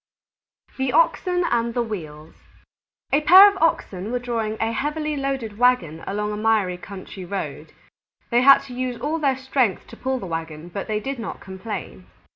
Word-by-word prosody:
_ -, -, -26 dB
THE 265 Hz, -1 st, 0 dB
OXEN 365 Hz, -7 st, +2 dB
AND 235 Hz, 0 st, 0 dB
THE 240 Hz, -, +1 dB
WHEELS 160 Hz, -8 st, -7 dB, 0.8 s
A 290 Hz, -, +4 dB
pair 370 Hz, +6 st, +9 dB
of 400 Hz, -2 st, -1 dB
Oxen 205 Hz, -, 0 dB
were 250 Hz, -, 0 dB
drawing 230 Hz, -3 st, -3 dB
a 225 Hz, 0 st, 0 dB
heavily 300 Hz, +4 st, -2 dB
loaded 265 Hz, -6 st, -3 dB
wagon 200 Hz, -11 st, +2 dB
along 210 Hz, +1 st, -2 dB
a 210 Hz, -, -4 dB
miry 210 Hz, -4 st, +1 dB
country 190 Hz, +1 st, -9 dB
road. 195 Hz, +2 st, -5 dB, 0.6 s
They 240 Hz, +1 st, +4 dB
had 275 Hz, +1 st, +7 dB
to 255 Hz, -, -10 dB
use 250 Hz, -1 st, -3 dB
all 315 Hz, +3 st, -2 dB
their 275 Hz, -4 st, +1 dB
strength 260 Hz, -6 st, 0 dB
to -, -, -12 dB
pull 260 Hz, 0 st, -2 dB
the 235 Hz, -, -6 dB
wagon, 165 Hz, -1 st, -6 dB
but 195 Hz, +3 st, -5 dB
they 215 Hz, -1 st, -1 dB
did 270 Hz, +3 st, -5 dB
not 225 Hz, -, -6 dB
complain. 190 Hz, -, -7 dB
230 Hz, 180 wpm, -23 LUFS, 195-270 Hz, 0.8 s, pair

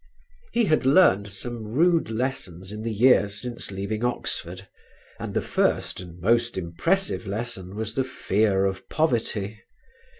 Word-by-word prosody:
He 235 Hz, -1 st, +2 dB
had 155 Hz, -5 st, +2 dB
learned 130 Hz, -, +5 dB
some 120 Hz, +3 st, -5 dB
rude 160 Hz, +8 st, +2 dB
lessons 105 Hz, -7 st, -3 dB
in 105 Hz, 0 st, -6 dB
the 115 Hz, +1 st, -2 dB
years 105 Hz, -2 st, +4 dB
since 125 Hz, -1 st, -5 dB
leaving 100 Hz, +3 st, -3 dB
Oxford, 95 Hz, -6 st, -3 dB, 0.5 s
and -, -, -5 dB
the -, -, +1 dB
first -, -, 0 dB
and 90 Hz, -1 st, -10 dB
most 115 Hz, +4 st, +2 dB
impressive 115 Hz, -, 0 dB
lesson 100 Hz, -3 st, -4 dB
was 110 Hz, 0 st, -4 dB
the 135 Hz, -, +1 dB
fear 105 Hz, -6 st, +1 dB
of 95 Hz, -1 st, -3 dB
poverty. 110 Hz, -8 st, -1 dB
110 Hz, 140 wpm, -25 LUFS, 95-125 Hz, 0.5 s, learned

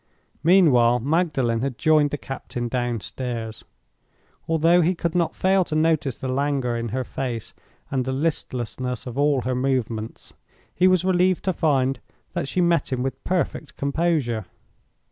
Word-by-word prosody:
Meanwhile, 130 Hz, -10 st, +5 dB
Magdalen 135 Hz, -6 st, +1 dB
had 130 Hz, -2 st, -2 dB
joined 155 Hz, -2 st, +4 dB
the 145 Hz, -, -3 dB
captain 125 Hz, -3 st, -5 dB
downstairs. 120 Hz, -1 st, -4 dB, 0.8 s
Although 165 Hz, +2 st, +4 dB
he 175 Hz, +3 st, +2 dB
could 170 Hz, -1 st, -2 dB
not 175 Hz, -2 st, 0 dB
fail 190 Hz, 0 st, +3 dB
to 155 Hz, -, -4 dB
notice 155 Hz, -5 st, +1 dB
the 130 Hz, -, -4 dB
languor 135 Hz, -2 st, 0 dB
in 115 Hz, 0 st, -3 dB
her 130 Hz, +4 st, -2 dB
face 120 Hz, -3 st, -5 dB, 0.4 s
and 130 Hz, -2 st, 0 dB
the 130 Hz, -, -3 dB
listlessness 130 Hz, -4 st, -2 dB
of 125 Hz, -2 st, -6 dB
all 145 Hz, -1 st, +2 dB
her 130 Hz, +1 st, -1 dB
movements, 125 Hz, -4 st, -2 dB, 0.4 s
he 180 Hz, +3 st, +4 dB
was 185 Hz, -1 st, +3 dB
relieved 185 Hz, -1 st, +2 dB
to 190 Hz, -, +1 dB
find 135 Hz, -5 st, +1 dB, 0.3 s
that -, -, -2 dB
she 180 Hz, -, 0 dB
met 170 Hz, -4 st, +2 dB
him 125 Hz, -1 st, -1 dB
with 135 Hz, -, -4 dB
perfect 180 Hz, -4 st, -2 dB
composure. 140 Hz, -, 0 dB
135 Hz, 150 wpm, -23 LUFS, 125-165 Hz, 0.8 s, Meanwhile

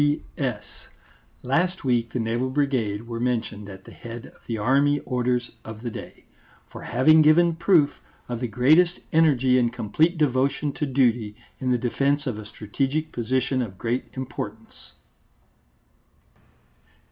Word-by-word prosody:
P.S. 135 Hz, -6 st, -1 dB, 0.8 s
Last 175 Hz, +8 st, 0 dB
week 120 Hz, -3 st, +1 dB
the -, -, -3 dB
Naval 120 Hz, +2 st, -1 dB
Brigade 130 Hz, -7 st, 0 dB
were 115 Hz, 0 st, -5 dB
mentioned 110 Hz, -4 st, -2 dB
at 95 Hz, -1 st, -11 dB
the -, -, -12 dB
head 120 Hz, +1 st, -9 dB
of -, -, -17 dB
the 115 Hz, -, -2 dB
Army 140 Hz, +6 st, +2 dB
Orders 125 Hz, -1 st, -1 dB
of 110 Hz, +1 st, -9 dB
the 120 Hz, -, -3 dB
day, -, -, -10 dB, 0.5 s
_for -, -, -9 dB
having 155 Hz, +6 st, +5 dB
given 165 Hz, +2 st, +5 dB
proof 165 Hz, -4 st, +4 dB, 0.4 s
of 120 Hz, -2 st, -4 dB
the 125 Hz, -, -2 dB
greatest 155 Hz, -, +3 dB
energy 135 Hz, -6 st, +4 dB
and 120 Hz, -1 st, +1 dB
complete 125 Hz, -, +1 dB
devotion 140 Hz, 0 st, +1 dB
to 150 Hz, -, -3 dB
duty 120 Hz, -5 st, +1 dB, 0.2 s
in 130 Hz, -, -2 dB
the 125 Hz, -, +3 dB
defence 140 Hz, +4 st, 0 dB
of 120 Hz, -6 st, -3 dB
a 105 Hz, -, -9 dB
strategic 135 Hz, +9 st, -2 dB
position 130 Hz, +2 st, -1 dB
of 100 Hz, -6 st, -5 dB
great 120 Hz, +4 st, -3 dB
importance_. 115 Hz, -4 st, -8 dB
125 Hz, 145 wpm, -24 LUFS, 115-145 Hz, 0.8 s, having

